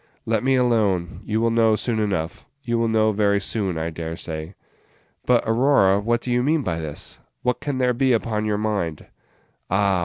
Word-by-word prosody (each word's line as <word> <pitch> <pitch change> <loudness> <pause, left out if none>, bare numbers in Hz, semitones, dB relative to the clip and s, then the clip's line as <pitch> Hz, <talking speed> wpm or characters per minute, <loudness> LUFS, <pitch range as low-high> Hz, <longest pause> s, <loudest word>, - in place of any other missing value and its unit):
Let 110 0 0
me 135 +1 +3
alone; 105 -9 +1
you 110 +1 0
will 115 0 +2
know 115 -1 +4
soon 110 +1 -1
enough 95 -1 -2
you 120 -3 0
will 115 - +2
know 110 -1 +3
very 100 -1 +2
soon, 100 -3 -2
I 80 +1 -2
dare 80 0 -5
say." 80 +1 -6 0.7
"But, 125 -1 +4
Aurora, 115 -5 +4
what 120 +3 0
do 125 - -4
you 120 0 +2
mean 150 +3 +1
by 85 -5 -2
this? 75 -2 -6 0.2
What 125 0 0
can 140 -3 -3
there 125 -1 +2
be 130 +2 +2
upon 110 -2 0
your 105 -1 0
mind?" 100 -8 -2 0.6
"Ah! 95 -1 +2
110 Hz, 190 wpm, -23 LUFS, 95-120 Hz, 0.7 s, know